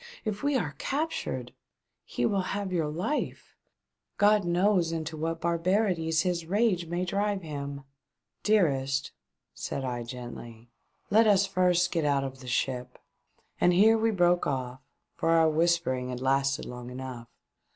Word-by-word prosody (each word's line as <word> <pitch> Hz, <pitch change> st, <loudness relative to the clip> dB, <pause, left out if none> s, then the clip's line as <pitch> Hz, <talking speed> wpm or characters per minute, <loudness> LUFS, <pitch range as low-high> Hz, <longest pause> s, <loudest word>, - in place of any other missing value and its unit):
If 210 Hz, -1 st, -3 dB
we 285 Hz, 0 st, +1 dB
are 160 Hz, -, -2 dB
captured 315 Hz, +4 st, -3 dB, 0.3 s
— -, -, -56 dB
he -, -, +1 dB
will 200 Hz, -3 st, +1 dB, 0.2 s
have 200 Hz, -2 st, -3 dB
your 165 Hz, -4 st, +1 dB
life 180 Hz, -, -3 dB, 0.3 s
' -, -, -59 dB, 0.3 s
God 205 Hz, -1 st, +4 dB
knows 175 Hz, 0 st, +2 dB
into 160 Hz, -1 st, -4 dB
what 165 Hz, +1 st, -3 dB
barbarities 170 Hz, -1 st, +1 dB
his 175 Hz, -3 st, -1 dB
rage 195 Hz, -3 st, +1 dB
may 175 Hz, +2 st, -2 dB
drive 200 Hz, +1 st, -1 dB
him 140 Hz, -2 st, -6 dB, 0.2 s
!" -, -, -58 dB
" -, -, -57 dB
Dearest," 140 Hz, -10 st, +1 dB, 0.4 s
said 135 Hz, -, -4 dB
I, 120 Hz, -1 st, -3 dB
gently, 120 Hz, -1 st, -9 dB, 0.2 s
" -, -, -43 dB
let 220 Hz, +2 st, +5 dB
us 200 Hz, -1 st, +5 dB
first 180 Hz, -2 st, +2 dB
get 165 Hz, -3 st, 0 dB
out 140 Hz, -2 st, +2 dB
of 135 Hz, -1 st, -6 dB
the 130 Hz, -, -11 dB
ship." 125 Hz, 0 st, -2 dB, 0.6 s
And 175 Hz, -, +4 dB
here 215 Hz, +5 st, +6 dB
we 225 Hz, 0 st, +2 dB
broke 175 Hz, -4 st, +2 dB
off, 130 Hz, -2 st, -3 dB, 0.3 s
for 165 Hz, -, -1 dB
our 165 Hz, -1 st, +5 dB
whispering 155 Hz, -6 st, +1 dB
had 125 Hz, -1 st, -4 dB
lasted 135 Hz, +1 st, +1 dB
long 125 Hz, 0 st, -8 dB
enough. 125 Hz, -2 st, -7 dB
165 Hz, 160 wpm, -28 LUFS, 135-195 Hz, 0.6 s, here